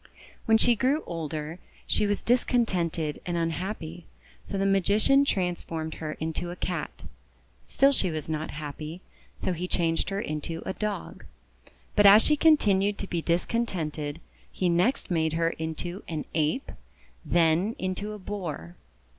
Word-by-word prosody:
When 225 0 +5
she 240 +1 +4
grew 265 +7 +1
older, 160 0 -4 0.3
she 210 - +2
was 205 0 -1
discontented 185 -11 +1
and 175 -1 -2
unhappy; 165 0 -3 0.4
so 200 - -4
the 195 - +1
Magician 205 +8 +4
transformed 175 - -2
her 155 -1 -3
into 160 +3 -3
a 175 - -5
Cat. 180 0 -4 0.6
Still 275 +1 +4
she 200 -9 +1
was 155 -2 -4
not 155 0 -2
happy, 155 +3 -6 0.4
so 185 - -1
he 175 +2 -3
changed 165 -1 0
her 195 0 -2
into 160 -1 -4
a - - -2
Dog. 210 0 -4 0.7
But 205 -1 +7
as 205 +3 +9
she 300 - +4
continued 205 -11 +4
to - - -3
be 170 -3 -2
discontented, 165 -5 -1 0.3
he 180 - 0
next 185 +8 +1
made 160 -2 +1
her 165 0 +1
into 160 +4 -5
an 155 -2 -3
Ape, 155 - 0 0.5
then 170 +5 +2
into 190 +3 -3
a - - -6
Boar. 170 - -6
175 Hz, 145 wpm, -27 LUFS, 160-205 Hz, 0.7 s, as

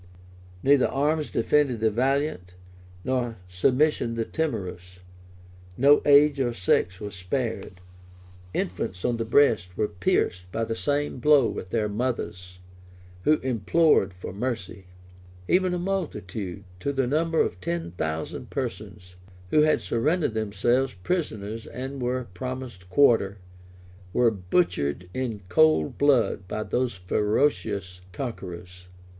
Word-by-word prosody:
Neither 140 -1 +5
arms 150 +2 0
defended 130 0 +2
the 110 0 +2
valiant, 130 -6 -1 0.5
nor 125 -3 -1
submission 125 +6 +1
the 115 -1 -1
timorous; 90 - -4 0.8
no 140 +3 +6
age 145 0 +6
or 120 -3 +1
sex 90 -1 +1
was 105 -2 -6
spared; 95 0 -3 0.7
infants 90 0 -3
on 120 -1 +1
the 115 - -2
breast 110 -8 +3
were 110 - +1
pierced 90 0 -1
by 115 - -1
the 115 - -3
same 145 +3 -1
blow 145 +2 +5
with 90 - -5
their 110 0 0
mothers, 100 -5 -3 0.7
who 155 - +6
implored 130 - +3
for 90 0 -7
mercy; 105 -4 -4 0.6
even 185 0 +3
a 180 - -1
multitude, 110 - -4 0.2
to 140 - -1
the 135 -2 0
number 160 +5 +1
of 90 +1 0
ten 85 -1 -3
thousand 80 -2 -4
persons, 90 0 -6 0.3
who 155 - +5
had 155 0 +3
surrendered 150 +3 0
themselves 110 +3 0
prisoners 115 - -3
and 130 +1 -6
were 125 0 -1
promised 125 -3 -6
quarter, 105 -4 +4 0.8
were 120 -2 +4
butchered 90 - 0
in 120 -6 -3
cold 80 -3 +3
blood 120 -9 +2
by 110 - -3
those 125 0 -1
ferocious 100 -1 0
conquerors. 90 -5 -7
115 Hz, 125 wpm, -26 LUFS, 90-135 Hz, 0.8 s, no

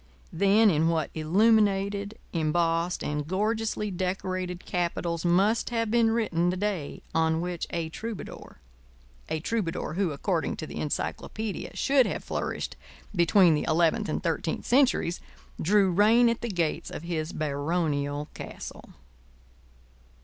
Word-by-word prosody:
Then 200 +5 +5
in 160 0 +2
what 160 -3 0
illuminated, 200 +3 +2 0.2
embossed, 165 +1 0
and 150 0 -2
gorgeously 210 +2 -1
decorated 185 -1 -3
capitals 170 -2 -2
must 195 +6 +2
have 230 -2 -1
been 230 -1 +4
written 195 -7 +1
the 180 - -1
day 190 -7 -3
on 160 0 +2
which 175 0 -3
a 170 -1 -2
troubadour—a 65 - -9
troubadour 175 -7 -2
who, 190 +1 +1
according 165 +4 -1
to 155 - -6
the - - -8
encyclopædia, 210 +7 -4
should 270 -2 +3
have - - -4
flourished - - -3 0.4
between 175 0 +5
the 150 - 0
eleventh 170 +7 +2
and - - -1
the - - -26
thirteenth 165 -1 -2
centuries—drew 205 - +1
rein 220 +6 +5
at 230 - -2
the 235 - -3
gates 170 -6 -1
of - - -7
his 165 -1 -3
baronial 145 -1 -1
castle! - - -9
175 Hz, 125 wpm, -27 LUFS, 160-210 Hz, 0.4 s, Then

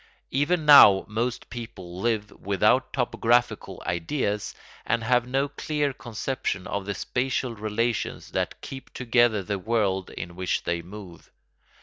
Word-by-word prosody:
Even 155 +4 +1
now 105 -10 +9
most 115 +3 -2
people 95 -7 -8
live 110 -3 0
without 105 +6 +1
topographical 120 -1 0
ideas 100 - -2 0.3
and 115 0 0
have 125 +1 +2
no 135 +2 +1
clear 145 0 -2
conception 115 -4 -4
of 100 +1 -4
the 100 - -2
spatial 125 +1 -2
relations 110 +2 -2
that - - -2
keep 135 -1 -9
together 120 -4 +2
the 100 +1 -3
world 100 -3 0
in 85 +1 -7
which 95 0 -1
they 85 0 -1
move. 90 0 -11
115 Hz, 130 wpm, -26 LUFS, 100-125 Hz, 0.3 s, now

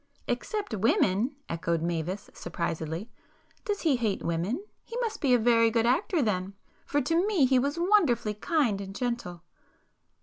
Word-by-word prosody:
"Except 420 - -3
women!" 215 +4 +2
echoed 165 0 -1
Mavis 175 +4 -3
surprisedly—"Does 170 - -5
he 300 -6 +3
hate 220 -5 -1
women? 175 - -1 0.2
He 465 - -7
must 455 -3 -2
be 275 - +2
a - - +5
very 230 0 +4
good 230 0 +1
actor 305 - +2
then,—for 200 +7 -3
to 330 +8 +1
me 380 -10 +3
he 260 0 +4
was 285 +5 -1
wonderfully 335 - +3
kind 230 - 0
and 195 0 -8
gentle." 220 -8 -3
235 Hz, 140 wpm, -28 LUFS, 190-300 Hz, 0.2 s, a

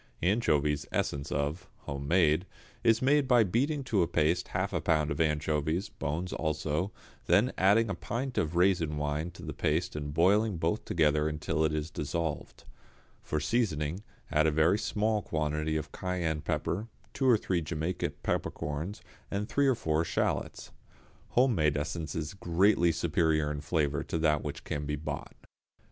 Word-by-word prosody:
=Anchovies, 75 -8 +2
Essence 70 0 -2
of= 75 +6 -2
(home 70 0 -5
made), 85 +1 +3 0.4
is 115 0 +4
made 140 +1 +4
by 120 -3 +6
beating 135 - 0
to 110 -7 +1
a 85 - +2
paste 85 +1 +1
half 95 +2 -2
a 85 - 0
pound 80 -1 +1
of 70 - -1
anchovies, 80 +2 0
bones 85 +6 -3
also, 80 +3 -1 0.4
then 120 +5 +4
adding 105 +5 +4
a 100 - -2
pint 125 +6 -4
of 80 +2 -1
raisin 85 -4 +2
wine 75 +3 -1
to 85 - -12
the - - -5
paste 80 +3 0
and 75 -1 -4
boiling 100 +5 +3
both 85 +6 -1
together 75 -2 +2
until 80 +1 -1
it 80 - +2
is 75 +1 -3
dissolved. 80 +1 -4 0.6
For 75 - -2
seasoning 80 - 0 0.3
add 80 0 +3
a - - +3
very 80 +7 +3
small 105 0 0
quantity 75 -1 -1
of 75 -3 -5
cayenne 85 -4 -2
pepper, 95 +6 -2 0.3
two 130 -1 +2
or 120 - +6
three 90 -4 -1
Jamaica 80 +3 -2
peppercorns 80 +9 -3 0.3
and 100 +1 -2
three 140 +2 +2
or 130 - +4
four 80 -7 0
shallots. - - -2 0.7
Home 125 0 +5
made 75 -5 +2
essence 75 +1 -3
is 80 0 -3
greatly 90 -1 +3
superior 80 -2 +1
in 75 -1 -4
flavour 75 -2 0
to - - -2
that 75 -2 +2
which 75 - -5
can 75 -1 -3
be 75 - -1
bought. 75 +2 -6
80 Hz, 165 wpm, -30 LUFS, 75-95 Hz, 0.7 s, by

